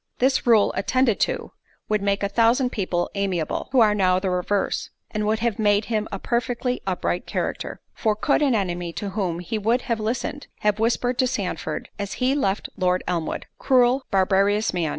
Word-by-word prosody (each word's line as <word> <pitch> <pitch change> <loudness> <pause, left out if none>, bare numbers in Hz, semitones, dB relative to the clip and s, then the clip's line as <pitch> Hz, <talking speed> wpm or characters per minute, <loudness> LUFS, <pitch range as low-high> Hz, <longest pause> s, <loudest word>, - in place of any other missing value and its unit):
This 260 0 +2
rule 220 -4 +5
attended 235 +3 +1
to, - - -1 0.4
would 215 -1 +1
make 200 0 0
a - - +2
thousand 235 +4 +3
people 185 -4 -1
amiable, 190 -5 -2
who 260 - +5
are 215 -2 +5
now 185 -3 +3
the 185 0 -1
reverse; 180 +2 -1 0.2
and 210 0 -1
would 220 +1 +1
have 235 -3 0
made 205 -1 +3
him 215 -1 0
a 195 - -3
perfectly 245 +3 -1
upright 180 -1 -1
character. - - -3
For 215 -2 0
could 280 +8 +1
an 275 -5 +3
enemy 175 -4 -2
to 205 - -4
whom 185 -4 -2
he 215 +5 -3
would 230 +4 +1
have 230 -2 -1
listened, 245 +6 -3
have 210 0 +1
whispered 245 +2 +1
to 255 - +4
Sandford 180 -8 -3
as 200 -1 -3
he 255 +6 +1
left 205 -8 0
Lord 180 -1 +1
Elmwood, 170 -3 -2
"Cruel, 255 +1 +3
barbarous 200 +2 +2
man! 170 -3 0
210 Hz, 185 wpm, -23 LUFS, 190-240 Hz, 0.4 s, rule